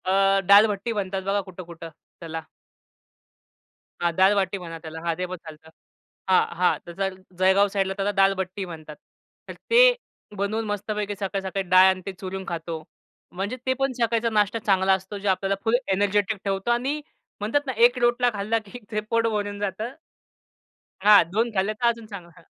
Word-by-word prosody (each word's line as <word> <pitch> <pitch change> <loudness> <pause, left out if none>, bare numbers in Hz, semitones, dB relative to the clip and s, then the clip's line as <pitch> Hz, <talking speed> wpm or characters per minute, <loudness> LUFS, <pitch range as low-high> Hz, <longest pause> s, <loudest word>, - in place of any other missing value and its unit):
अ, 195 +1 +3
डाल 200 +2 +8
भट्टी 210 +2 -3
म्हणतात 195 -2 -3
बघा 200 +1 0
कुठं-कुठं 170 -3 -10 0.3
त्याला. 165 -1 -6 1.6
हां, 170 0 +1
दाल 190 +3 +5
बाटी 195 0 0
म्हणा 170 -3 -8
त्याला, 160 0 -8
हां 170 -1 0
ते 180 - -2
पण 185 0 -6
चालतं. 160 -1 -13 0.6
हां, 185 - +5
हां, 180 0 +3
त्याचा 195 +3 -3
जळ 190 - -12 0.2
जळगाव 190 +2 +4
साइडला 195 -1 0
त्याला 200 +1 0
दाल 195 0 +3
बट्टी 190 +1 -5
म्हणतात. 155 -3 -9 0.5
तर - - -5 0.2
ते 470 +1 +7 0.6
बनवून 215 +3 -1
मस्तपैकी 205 0 -3
सकाळी-सकाळी 195 -1 -3
डाळ 185 +1 +7
आणि 190 0 -1
ते 195 - -3
चुरून 190 0 -6
खातो. 165 -1 -5 0.5
म्हणजे 200 +7 -4
ते 260 - +2
पण 270 0 +1
सकाळीचा 230 0 +1
नाष्टा 210 0 +1
चांगला 195 -3 +2
असतो 190 +2 -4
जे 200 - -5
आपल्याला 195 +1 +1
फुल 225 +1 +2 0.2
एनर्जेटिक 205 +2 +1
ठेवतो 195 +3 -1
आणि 265 +5 0 0.4
म्हणतात 220 +8 0
ना, 260 - -1
एक 240 +3 +4
रोटला 240 0 +3
खाल्ला 210 +2 0
की 225 +5 -10
ते 215 - 0
पोट 230 0 +2
भरून 205 -2 -2
जातं. 205 +5 -3 1.1
हां, 210 -2 +8
2 225 +4 +1
खाल्ले 195 +3 +1
तर 235 +3 0
अजून 230 -1 -4
चांगला, 200 -5 -10
हां. - - -17
195 Hz, 175 wpm, -24 LUFS, 185-215 Hz, 1.6 s, डाल